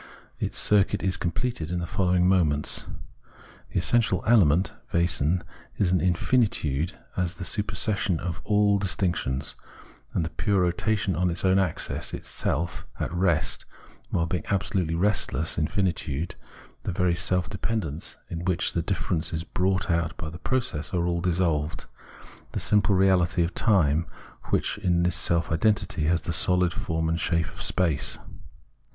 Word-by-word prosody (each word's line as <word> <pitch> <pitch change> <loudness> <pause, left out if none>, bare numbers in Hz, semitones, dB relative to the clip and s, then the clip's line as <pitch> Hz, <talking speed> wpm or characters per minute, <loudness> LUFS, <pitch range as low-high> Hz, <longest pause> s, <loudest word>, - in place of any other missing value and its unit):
Its - - -2
circuit 105 -2 +3
is 95 -1 +1
conapleted 85 -1 -2
in 90 - -2
the 85 - -2
following 90 0 +2
moments. 80 -6 +1 0.8
The - - -3
essential 115 +6 +2
element 95 -6 +4 0.2
(Wesen) 85 0 +1 0.3
is 95 -3 +2
infinitude 90 - +1 0.2
as 90 -1 -1
the 90 0 -6
supersession 100 -3 0
of 85 -1 -4
all 105 -1 +3
dis 95 -4 +1
tinctions, 75 -7 +1 0.6
the 80 -1 0
pure 95 +5 +1
rotation 95 +2 0
on 90 0 +1
its 85 +2 -2
own 95 +1 +4
axis, 90 -5 -2
itself 85 +3 -3
at - - -2
rest 85 -3 0 0.4
while 85 - +1
being 85 -1 -2
absolutely 95 -4 0
restless 85 -5 0
infinitude, 85 -3 -1 0.5
the - - -3
very 90 0 +1
self 90 +1 0
dependence 95 -6 -3
in 85 0 -5
which 90 -1 0
the - - 0
differences 80 -1 -1
brought 95 +2 0
out 85 -1 -1
in 80 - -5
the 85 - -9
process 100 - -2
are 85 -1 +1
all 85 -1 0
dissolved, 80 -4 0 0.7
the - - -1
simple 105 -1 +3
reahty 90 -2 +3
of 85 - -2
time, 85 -8 +2 0.4
which - - -1
in 90 -3 +1
this 90 -1 +1
self 85 -1 +1
identity 80 -2 +1
has 85 +2 +2
the - - -3
sohd 90 +1 +3
form 80 0 -2
and 80 +1 0
shape 85 0 0
of - - -11
space. 80 -6 +1
90 Hz, 145 wpm, -26 LUFS, 80-95 Hz, 0.8 s, element